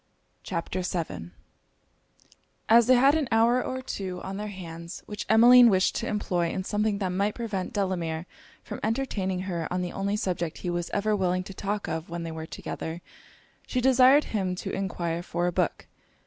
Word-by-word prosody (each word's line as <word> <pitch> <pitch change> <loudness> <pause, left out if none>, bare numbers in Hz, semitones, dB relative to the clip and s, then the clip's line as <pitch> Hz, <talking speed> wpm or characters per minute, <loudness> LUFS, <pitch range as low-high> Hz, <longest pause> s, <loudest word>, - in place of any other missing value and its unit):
CHAPTER 170 +2 -3
VII 170 - -4 1.4
As 230 0 +6
they 255 - +7
had 270 +3 +5
an 310 -4 +1
hour 235 +3 +3
or 260 0 -4
two 185 -7 -4
on 195 +1 -5
their 210 +1 -4
hands, 170 -3 -8
which 210 -1 -6
Emmeline 240 +2 +8
wished 190 -2 +3
to 235 - -3
employ 180 -5 0
in 185 - -3
something 210 +1 0
that 195 -2 -1
might 200 +3 0
prevent 210 -6 -3
Delamere 175 -5 -2 0.4
from - - -7
entertaining 210 -6 -1
her 175 -4 -3
on 180 0 -1
the 180 - -4
only 200 +1 -1
subject 175 -5 -2
he 175 - 0
was 175 -1 -2
ever 210 +1 +1
willing 185 -2 0
to 195 - -9
talk 205 +2 -3
of 160 +2 -4
when 170 0 -4
they 165 - -5
were 160 0 -6
together, 165 +2 -6 0.6
she 255 - -1
desired 260 +3 +6
him 190 -4 -2
to - - -5
enquire 170 -3 -2
for 175 0 -2
a 180 - +1
book. - - -1
190 Hz, 180 wpm, -27 LUFS, 175-220 Hz, 1.4 s, Emmeline